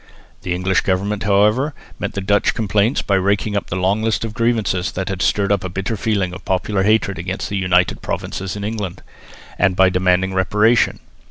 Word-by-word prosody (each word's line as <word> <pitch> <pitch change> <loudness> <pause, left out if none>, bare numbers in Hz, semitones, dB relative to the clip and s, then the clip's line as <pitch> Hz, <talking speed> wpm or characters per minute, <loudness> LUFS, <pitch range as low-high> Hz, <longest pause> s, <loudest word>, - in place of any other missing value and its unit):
The 90 -1 -2
English 95 +2 +1
government, 100 +2 -1
however, 105 +8 +2 0.2
met - - -3
the 100 - -3
Dutch 100 +2 +2
complaints 110 +2 +1
by 100 - -1
raking 100 +1 +1
up 100 - -2
the - - -4
long 95 +3 +1
list 115 0 0
of 110 - -6
grievances 110 -6 0
that 95 0 -3
had 95 -2 -3
stirred 100 -1 +1
up 100 -2 +1
a 95 - -3
bitter 95 +5 -3
feeling 100 -4 -1
of 90 - -9
popular 95 +1 0
hatred 100 -3 +1
against 90 +3 -4
the 100 - -2
United 90 -1 +2
Provinces 95 -1 -4
in 100 - -5
England, 105 -4 -4 0.6
and 95 - +3
by 95 0 +5
demanding 90 +1 +1
reparation. 105 +5 +2
100 Hz, 190 wpm, -19 LUFS, 95-105 Hz, 0.6 s, by